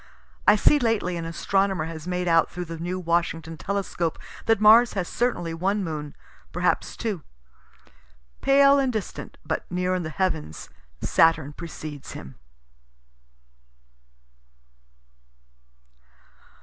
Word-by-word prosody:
(I 210 - +8
see 295 +8 +4
lately 225 -7 0
an 165 -1 -4
astronomer 190 +1 0
has 165 0 -7
made 180 0 -1
out 165 -1 +4
through 180 0 -5
the 165 -1 -7
new 180 +2 -3
Washington 165 -1 -1
telescope 185 -2 -2 0.3
that 225 -2 +4
Mars 220 +3 +7
has 190 -3 -2
certainly 230 -9 -1
one 195 +5 0
moon, 150 -4 -5 0.4
perhaps - - 0
two.) 210 -8 -3 1.2
Pale 275 0 +6
and 265 -2 +1
distant, 215 -4 -5
but - - -3
near 180 +1 0
in 185 - 0
the 160 - -4
heavens, 160 - -2 0.3
Saturn 160 -3 +3
precedes 155 -3 -8
him. 65 - -9
180 Hz, 115 wpm, -25 LUFS, 165-205 Hz, 1.2 s, I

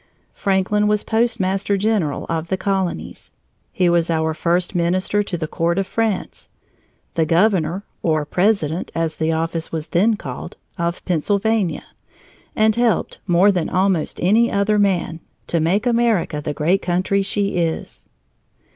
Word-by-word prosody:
Franklin 200 +2 +1
was 210 0 +1
postmaster 205 -4 +1
general 195 -8 0
of 165 0 -2
the 190 - -1
colonies; 190 -2 -3 0.4
he 185 -7 +1
was 170 -1 +2
our 160 -1 0
first 175 +3 0
minister 185 +3 +1
to 195 -3 -3
the 160 -2 -3
Court 170 +3 -1
of 195 - +1
France, 220 -2 -2 0.6
the 165 - +1
governor 175 +1 +2 0.2
(or 155 -3 +1
president, 180 -2 0
as 165 -1 -1
the 160 0 0
office 165 0 -2
was 160 0 -4
then 210 +6 +3
called) - - -8 0.2
of 170 -1 -3
Pennsylvania, 200 +3 0 0.7
and 215 0 +3
helped, 240 -2 0
more 180 +3 +5
than 175 -4 -1
almost 185 -3 0
any 225 +6 +4
other 205 +1 +2
man, 180 -5 0 0.3
to 170 - 0
make 180 +8 +1
America 230 -10 +1
the 150 - -3
great 160 +6 +1
country 185 +3 0
she 200 -1 -1
is. 165 -2 -3
185 Hz, 145 wpm, -20 LUFS, 165-205 Hz, 0.7 s, more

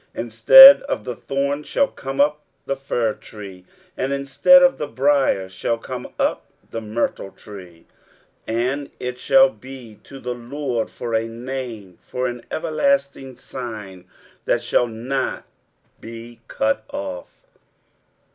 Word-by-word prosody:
23:055:013 - - -3
Instead 120 - +9
of 280 - -4
the 125 - -5
thorn 140 +3 -2
shall 280 - 0
come 135 - -7
up 150 +1 +2 0.2
the 135 - -2
fir 120 -5 -2
tree, 100 -5 -12 0.3
and 130 +1 -2
instead 140 - +5
of 270 0 +3
the 150 - -3
brier 135 -8 +1
shall 95 +5 -3
come - - -7
up - - -1 0.2
the 115 - -5
myrtle 110 -2 -3
tree: 90 -5 -13 0.6
and 125 +5 -2
it 125 0 -5
shall 270 - +5
be 130 - -12
to 135 - -12
the 125 -1 -4
LORD 120 -1 -4
for 120 -1 -6
a 115 0 0
name, 115 -5 -7
for 125 0 -4
an 120 -1 -4
everlasting 155 - -1
sign 110 -9 -8 0.4
that - - 0
shall 125 - +1
not 125 +4 -3 0.6
be 115 +1 -11
cut 110 0 -1
off. 90 -2 -8
125 Hz, 135 wpm, -21 LUFS, 110-140 Hz, 0.6 s, Instead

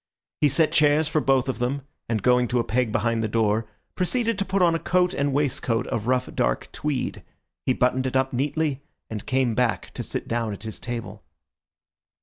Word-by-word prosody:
He 150 - +4
set 155 +3 +3
chairs 150 0 +4
for 155 -1 +1
both 135 -2 +2
of 130 -3 -2
them, 130 +3 -1 0.3
and 110 -4 -1
going 125 0 +4
to 125 - 0
a 120 - +2
peg 120 -1 0
behind 115 0 +1
the 110 - 0
door, 110 0 +1 0.3
proceeded 230 +3 0
to 195 - 0
put 195 -1 +1
on 170 -1 +4
a 165 - 0
coat 180 +1 +2
and 140 0 0
waistcoat 130 -4 0
of 115 0 -3
rough, 130 0 +2
dark - - 0
tweed; 150 -4 -2 0.5
he 130 - +4
buttoned 130 +1 +1
it 130 - -4
up 130 0 +1
neatly, 145 +2 0 0.3
and 105 -2 -5
came 130 -3 +2
back 120 0 0
to - - -5
sit - - -4
down 115 -2 -1
at 100 - -9
his 110 -1 -6
table. 120 -1 -6
130 Hz, 200 wpm, -25 LUFS, 115-150 Hz, 0.5 s, He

